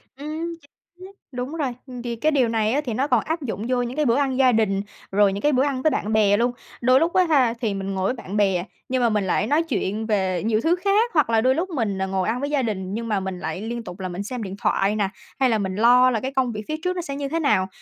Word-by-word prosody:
Ừm. 310 +4 -5 0.4
Chính 370 - -11
xác, 385 - -11 0.2
đúng 250 +3 -4
rồi. 285 -6 -1 0.3
Thì 240 -1 -3
cái 305 +7 +1
điều 265 -5 +3
này 220 -1 +1
á 290 - +1
thì 235 - -2
nó 265 +6 0
còn - - +2
áp 320 +1 -3
dụng 225 -5 -4
vô 250 -1 +2
những 245 +1 -4
cái 305 0 +1
bữa 235 -2 +3
ăn 270 -2 0
gia 260 -1 +5
đình, 210 -4 +1 0.3
rồi 200 0 +4
những 200 - -4
cái 295 - +3
bữa 260 -1 +3
ăn 275 -3 -1
với 310 - +4
bạn 215 -4 -2
bè 205 -2 +4
luôn. 240 +2 +2 0.3
Đôi 255 +2 +5
lúc 335 +2 +1
á 370 - +5
ha 260 -7 +4
thì 220 -4 0
mình 195 0 -4
ngồi 190 -1 -1
với 225 - +1
bạn 215 -5 -6
bè, 190 -4 +2 0.3
nhưng 255 0 +1
mà 235 - +4
mình 210 -3 0
lại 195 +3 +1
nói 300 +6 +2
chuyện 220 -8 -2
về 190 -5 0
nhiều 220 -1 +2
thứ 330 +7 +3
khác. 405 +6 +2
Hoặc 300 -7 +3
là 225 -1 +3
đôi 260 +2 +3
lúc 355 +5 -1
mình 225 - -1
ngồi 190 -1 0
ăn 230 +3 0
với 285 - -2
gia 290 -2 +1
đình 195 -5 -3
nhưng 230 +2 -3
mà 210 -3 0
mình 190 -1 -5
lại 185 - -4
liên 235 +2 -4
tục 180 -3 -9
là 185 - -4
mình 180 +3 -4
xem 240 +2 -5
điện 195 -1 -6
thoại 195 +2 +1
nè, 205 -2 +1 0.3
hay 260 -2 +4
là 225 - +2
mình 190 -2 -2
lo 245 +4 +6
là 230 - 0
cái 265 +4 -4
công 260 -3 +1
việc 215 -1 -5
phía 310 - -2
trước 365 0 0
nó 355 - -2
sẽ 280 -5 -5
như 280 0 -3
thế 325 +3 -1
nào. 190 - +2
235 Hz, 295 wpm, -23 LUFS, 205-280 Hz, 0.4 s, lo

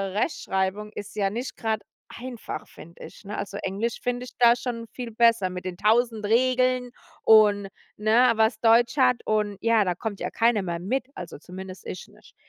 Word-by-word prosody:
Rechtschreibung 205 - -1
ist 205 +1 -8
ja 200 -2 +1
nicht 240 +6 -5
grad 220 -2 -1 0.3
einfach, 245 -2 -7
finde 170 +2 -14
ich, - - -12
ne? 205 +1 -6
Also, 200 0 -5
Englisch 205 +5 -2
finde 245 0 -2
ich - - -14
da 235 0 +6
schon 235 -1 -5
viel 245 -2 -6
besser 230 -4 +3
mit 180 0 -7
den 185 - -4
1.000 225 +1 +2
Regeln 255 +2 +2 0.3
und, 210 -2 +5 0.3
ne, 230 +4 +4
was 220 0 +2
Deutsch 235 +2 +4
hat 250 -3 +3
und, 210 -2 0
ja, 230 -2 +3
da 180 -2 -1
kommt 205 +1 -5
ja - - -3
keiner 230 -2 +2
mehr 175 -2 -3
mit, 245 +8 -2
also 175 -5 -8
zumindest 185 +3 -9
ich 185 - -7
nicht. - - -21
220 Hz, 185 wpm, -25 LUFS, 200-240 Hz, 0.3 s, da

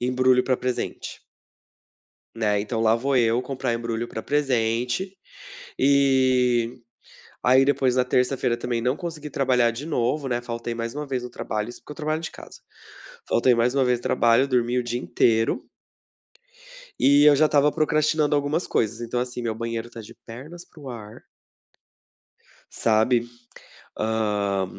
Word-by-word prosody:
embrulho 125 0 +3
pra 130 -1 0
presente. 125 -1 -4 1.2
Né, 105 -2 +1
então 110 +2 -3
lá 115 0 +3
vou 135 +3 0
eu 120 0 +3
comprar 130 -1 -3
embrulho 115 0 -3
pra 110 - -5
presente, 125 - -1 0.6
e 130 -3 +2 0.6
aí 130 +3 +5
depois, 135 -2 +1
na 125 0 +2
terça-feira 125 -1 +1
também 120 -1 -2
não 125 +4 0
consegui 155 -4 -7
trabalhar 125 -3 +2
de 130 +7 -7
novo, 135 0 -1
né, 120 0 -1
faltei 115 0 -5
mais 115 0 -4
uma 150 0 -5
vez 130 -2 -3
o 125 - -7
trabalho, 105 +1 -4
isso 120 - -10
porque 150 - -11
eu - - -11
trabalho 155 0 -2
de 165 - -6
casa, - - -13 0.7
faltei 120 +1 +3
mais 120 +2 +1
uma 135 -2 +2
vez 125 -1 +1
o - - -15
trabalho, 120 +3 +3
dormi 125 -2 0
o 125 - 0
dia 120 +1 -3
inteiro. 115 -2 +1 1.3
E 140 +2 +5
eu 145 - +6
já 155 +2 +4
estava 145 0 +3
procrastinando 155 -1 +1
algumas 145 +4 -1
coisas, 110 +1 -1
então, 120 +1 -3
assim, 125 0 -4
meu 115 -2 -2
banheiro 115 0 -4
está 115 - -10
de 105 - -12
pernas 150 +10 -10
para 175 -3 -18
o 140 - -9
ar. 110 -4 -10 1.5
Sabe, 115 +2 +2 0.8
hã, 105 -3 0
125 Hz, 155 wpm, -24 LUFS, 115-140 Hz, 1.5 s, eu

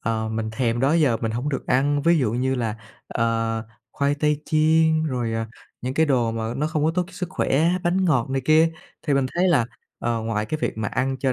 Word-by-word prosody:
ờ, 110 -1 -1
mình 110 0 -3
thèm 115 0 -1
đó 135 +4 +3
giờ 145 -9 +3
mình 115 -1 -2
hổng 125 +5 -2
được 140 - -3
ăn, 140 +3 +2
ví 170 +1 +4
dụ 115 -6 +1
như 130 +2 0
là, 115 -4 -2 0.3
ờ, 115 -1 -1 0.3
khoai 140 0 +1
tây 150 0 0
chiên, 160 0 +3
rồi, 125 -6 -2
à, 115 0 -2 0.4
những 130 +2 -3
cái 160 +1 +3
đồ 125 -5 +2
mà 115 +1 -3
nó 150 +3 0
không 155 -2 -1
có 160 - +3
tốt 180 - +2
cho 190 - -16
sức 180 0 -4
khỏe, 155 -2 +1 0.2
bánh 185 +2 +2
ngọt 135 -7 +1
này 135 - 0
kia. 160 +2 +5 0.3
Thì 145 - +1
mình 135 -1 +2
thấy 180 +2 +3
là, 145 -9 +3 0.3
ờ, 115 -1 -1
ngoài 110 -1 -2
cái 155 +6 -3
việc - - -2
mà 105 -2 -1
ăn 130 0 -1
cho 130 -1 +1
135 Hz, 240 wpm, -23 LUFS, 115-155 Hz, 0.4 s, kia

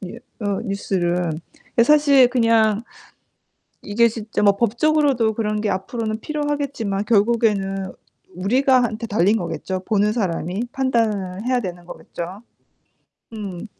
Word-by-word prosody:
뉴 180 - -7 0.2
어 200 -2 -1
뉴스를. 180 -4 -1 0.4
이게 235 - +4
사실 280 -2 +5
그냥 230 -3 +2 1.0
이게 225 +3 +3
진짜 220 -1 -4
뭐 200 -1 +4
법적으로도 245 0 +2
그런 215 -1 -2
게 210 - -1
앞으로는 215 +3 -3
필요하겠지만 280 -8 -2
결국에는 205 -4 +1 0.4
우리가 255 +8 +3
한테 230 -1 -3
달린 205 +1 +2
거겠죠. 185 +1 -4
보는 210 -1 +2
사람이 190 -1 -2
판단을 220 -8 -1
해야 250 0 +1
되는 175 -4 -7
거겠죠. 180 +2 -8 0.9
음. 200 -3 -6
215 Hz, 280 characters per minute, -21 LUFS, 195-240 Hz, 1.0 s, 사실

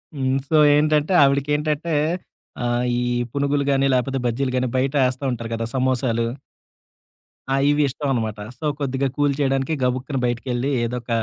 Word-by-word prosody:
హ్మ్. 130 -1 0
సో, 160 - +3 0.2
ఏంటంటే 150 +3 +2
ఆవిడకేంటంటే 150 +3 0 0.7
ఆహ్, 120 0 0
ఈ - - -1 0.3
పునుగులు 140 +1 0
గాని, 135 0 +2
లాపోతే 135 +2 0
బజ్జీలు 130 +3 -1
గాని 130 0 +1
బయట 135 +2 0
ఏస్తా 130 +2 -4
ఉంటారు 115 -2 -5
కదా! 115 0 -2
సమోసాలు. 125 -3 +1 1.3
ఆ! - - +3
ఇవి 145 +1 +3
ఇష్టమనమాట. 120 -6 -2 0.2
సో, - - -5
కొద్దిగా 135 -1 -1
కూల్ 145 -1 +2
చేయడానికి, 135 +1 0
గబుక్కని 130 +2 -1
బయటికెళ్ళి 120 +2 -1
ఏదోక 120 +1 -4
135 Hz, 140 wpm, -22 LUFS, 125-145 Hz, 1.3 s, సో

